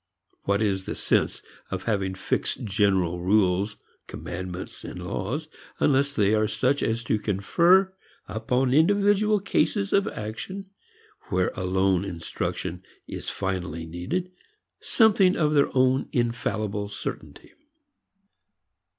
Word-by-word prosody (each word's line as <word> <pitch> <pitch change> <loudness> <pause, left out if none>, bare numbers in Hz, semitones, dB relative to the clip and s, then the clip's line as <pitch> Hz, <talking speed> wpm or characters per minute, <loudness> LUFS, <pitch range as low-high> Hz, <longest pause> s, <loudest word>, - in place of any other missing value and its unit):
What 100 +2 +2
is 95 -2 0
the - - -4
sense - - +1 0.3
in 95 - 0
having 95 -4 -1
fixed - - -2
general 95 -4 +1
rules, 100 +1 +2 0.3
commandments, 90 +1 -6
laws, 95 - -4 0.3
unless 140 0 +3
they 105 0 +3
are 110 0 +3
such 130 +6 +1
as 115 +1 0
to 110 -1 0
confer 170 - +3 0.3
upon 125 +4 0
individual 205 +6 +4
cases 200 +1 0
of 200 +1 +3
action 190 - -6 0.6
(where 90 -1 +1
alone 95 0 +1
instruction 85 -1 -4 0.2
is - - -6
finally 90 -4 -3
needed) 145 - -3 0.5
something 200 -5 +4
of 150 -2 +2
their 145 -1 +4
own 130 +1 +3
infallible 110 -4 -1
certainty? 80 -7 -7
110 Hz, 110 wpm, -26 LUFS, 95-150 Hz, 0.6 s, individual